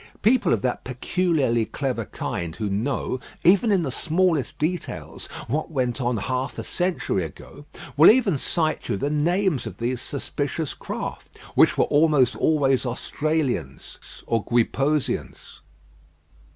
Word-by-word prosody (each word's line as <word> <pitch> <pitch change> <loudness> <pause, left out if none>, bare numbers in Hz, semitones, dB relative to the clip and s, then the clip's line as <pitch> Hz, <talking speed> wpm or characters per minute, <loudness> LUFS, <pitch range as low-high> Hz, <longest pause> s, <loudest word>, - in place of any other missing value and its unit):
People 235 +5 +4
of 110 - +1
that 125 - -1
peculiarly 130 -2 0
clever 125 -1 -3
kind 85 -4 -4
who 105 -3 -3
know, 125 +4 -1 0.2
even 200 +5 +5
in 190 -4 +3
the 135 - -2
smallest 165 -2 +1
details, 170 +2 -3 0.2
what 150 +6 -2
went 130 -4 -1
on 120 -1 0
half 130 +6 -3
a - - -4
century 175 - -1
ago, 110 - -10 0.3
will 150 +3 +8
even 215 - +4
cite 155 +2 -1
you - - 0
the 140 +9 -1
names 170 - +1
of 95 -4 -8
these 120 +1 -2
suspicious 145 +2 -3
craft, - - -7 0.2
which - - +4
were - - +4
almost 145 -4 +3
always 135 -4 +2
Austrians 135 - -2 0.3
or 115 -2 0
Guiposeans. 135 +5 -1
140 Hz, 135 wpm, -24 LUFS, 120-160 Hz, 0.3 s, will